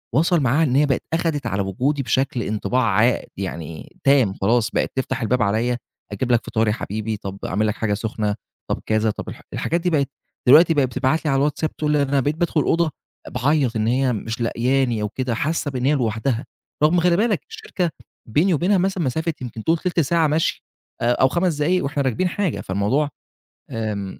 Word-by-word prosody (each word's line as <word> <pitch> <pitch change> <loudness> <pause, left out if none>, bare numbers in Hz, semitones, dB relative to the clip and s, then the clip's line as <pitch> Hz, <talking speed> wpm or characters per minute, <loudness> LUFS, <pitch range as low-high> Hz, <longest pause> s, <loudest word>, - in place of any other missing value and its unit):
وصَل 165 +4 +3
معها 140 +3 +2
إن 130 -5 +1
هي 145 +2 +5
بقت 135 -3 0
أخدِت 165 -3 0
على 100 +1 -1
وجودي 130 +9 -1
بشَكل 130 -1 0
انطباع 115 +4 0
عا 115 +3 +3 0.2
يعني 85 -4 -6
تام، 135 -8 +4
خلاص 115 +3 +2
بقت - - 0
تفتح 130 0 -2
الباب 120 +2 +1
عليَّ، 115 +4 +1 0.3
أجيب 120 +5 -2
لك 120 - +2
فطار 110 0 0
يا 105 - +2
حبيبي، 110 0 -3
طَب 100 0 -7
أعمل 105 +3 0
لك 105 - 0
حاجة 105 -2 -1
سخنة، 105 -1 -2 0.3
طَب - - -1
كذا، 110 0 +1
طَب - - -7
الح - - -9
الحاجات 170 +1 -1
دي، 180 - +1
بقت 145 -5 +1 0.4
دلوقتي 160 +6 +7
بقى 145 -3 +3
بتبعت 130 +5 0
لي 150 - +2
على 135 - +2
الواتساب، 150 +2 -1
تقول 150 -1 -1
لي 150 -1 +3
أنا 140 0 +1
بقيت 145 +3 0
بادخل 170 -1 0
الأوضة 165 +2 +1 0.4
باعيَّط، 130 -1 +1
إن 110 0 0
هي 130 +1 +2
مش 115 +2 -4
لقياني 120 0 +1
أو 105 - -1
كده، 125 +1 -2
حاسة 150 +3 -1
إن 125 0 -1
هي 145 - +4
لوحدها، 120 +1 -1 0.4
رغم 170 +3 +5
خلِّ 175 0 +3
بالك 215 +1 +1
الشركة 430 - -3 0.4
بيني 165 - +3
وبينها 180 +6 +2
مثلًا 190 -1 0
مسافة 160 +5 -1
يمكن 115 -3 -6
تقول 165 +1 +2
تِلت 180 0 -1
ساعة 165 +2 +3
مَشي، 155 +2 0 0.4
آآ 120 - +3
أو 125 +2 +4
5 170 +3 0
دقايق 170 +5 +1
وإحنا 140 0 -1
راكبين 135 +8 0
حاجة، 195 -3 -1
فالموضوع، 105 +10 0 0.6
آمم 105 -4 -4
130 Hz, 200 wpm, -22 LUFS, 110-155 Hz, 0.6 s, دلوقتي